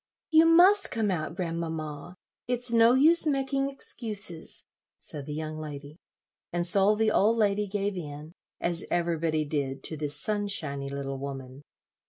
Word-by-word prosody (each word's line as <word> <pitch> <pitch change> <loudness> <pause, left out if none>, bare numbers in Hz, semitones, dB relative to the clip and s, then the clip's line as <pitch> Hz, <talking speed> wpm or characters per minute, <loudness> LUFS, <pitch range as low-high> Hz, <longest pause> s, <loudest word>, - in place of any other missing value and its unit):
"You 320 +1 +6
must 370 +5 +6
come 220 -4 -1
out, 160 -2 -4
grandmamma; 165 -2 -5 0.3
it's 245 -1 +1
no 230 +1 +5
use 320 +4 +5
making 275 -1 0
excuses," 210 -10 0 0.3
said 145 -1 -8
the 150 - -5
young 155 0 -5
lady; 150 0 -9 0.5
and 175 0 -2
so 195 +4 +3
the 220 0 +1
old 220 +2 +2
lady 205 -1 +1
gave 200 0 -2
in, 150 -2 -8 0.3
as 170 0 -2
everybody 165 -2 -1
did 140 -3 -3
to 160 - -4
this 145 -1 0
sunshiny 180 -10 -2
little 135 -1 -5
woman. 135 -1 -8
175 Hz, 145 wpm, -27 LUFS, 150-220 Hz, 0.5 s, You